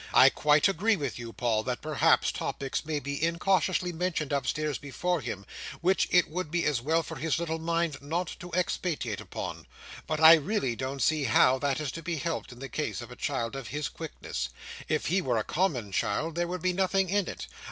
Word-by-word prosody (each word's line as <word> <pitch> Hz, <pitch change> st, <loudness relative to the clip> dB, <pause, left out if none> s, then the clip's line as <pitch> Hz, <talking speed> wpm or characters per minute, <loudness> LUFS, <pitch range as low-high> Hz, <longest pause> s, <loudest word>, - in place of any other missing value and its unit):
I -, -, +9 dB
quite 150 Hz, +2 st, +4 dB
agree 205 Hz, +4 st, +2 dB
with 140 Hz, -8 st, -4 dB
you, 115 Hz, -1 st, -6 dB
Paul, 115 Hz, -2 st, 0 dB
that 125 Hz, -1 st, -3 dB
perhaps 155 Hz, -1 st, +3 dB
topics 135 Hz, -1 st, -3 dB
may 155 Hz, -1 st, -1 dB
be 140 Hz, +1 st, -4 dB
incautiously 180 Hz, +1 st, +1 dB
mentioned 160 Hz, -4 st, -1 dB
upstairs 145 Hz, +2 st, -1 dB
before 165 Hz, +5 st, -2 dB
him, 100 Hz, -5 st, -5 dB, 0.4 s
which 185 Hz, +2 st, +3 dB
it 180 Hz, -1 st, +4 dB
would 175 Hz, 0 st, -4 dB
be 175 Hz, +2 st, 0 dB
as 140 Hz, -6 st, +1 dB
well 160 Hz, +5 st, +1 dB
for 160 Hz, 0 st, -7 dB
his 160 Hz, +3 st, 0 dB
little 160 Hz, -1 st, -2 dB
mind 165 Hz, -3 st, -1 dB
not 165 Hz, +4 st, -2 dB
to 180 Hz, -3 st, -9 dB
expatiate 165 Hz, -, -1 dB
upon; -, -, -6 dB, 0.4 s
but 155 Hz, -1 st, -1 dB
I 160 Hz, +1 st, +10 dB
really 160 Hz, -, +1 dB
don't 130 Hz, +3 st, -3 dB
see 155 Hz, -3 st, +2 dB
how 130 Hz, +2 st, +5 dB
that 140 Hz, 0 st, 0 dB
is 150 Hz, -4 st, -2 dB
to 165 Hz, -, -7 dB
be 170 Hz, +1 st, -2 dB
helped, 165 Hz, -1 st, -3 dB
in 120 Hz, -, -11 dB
the 135 Hz, +2 st, -6 dB
case -, -, -3 dB
of -, -, -9 dB
a -, -, -8 dB
child 115 Hz, +2 st, -2 dB
of 135 Hz, -4 st, -6 dB
his 150 Hz, 0 st, -3 dB
quickness. 65 Hz, -, -5 dB, 0.4 s
If 155 Hz, 0 st, 0 dB
he 190 Hz, +3 st, +2 dB
were 125 Hz, -8 st, 0 dB
a 110 Hz, -, +1 dB
common 135 Hz, -, -1 dB
child, 155 Hz, -, 0 dB
there 175 Hz, +1 st, -1 dB
would 180 Hz, -1 st, -4 dB
be 185 Hz, 0 st, +2 dB
nothing 190 Hz, +1 st, +2 dB
in 200 Hz, +1 st, +1 dB
it. -, -, -6 dB
155 Hz, 210 wpm, -29 LUFS, 135-175 Hz, 0.4 s, I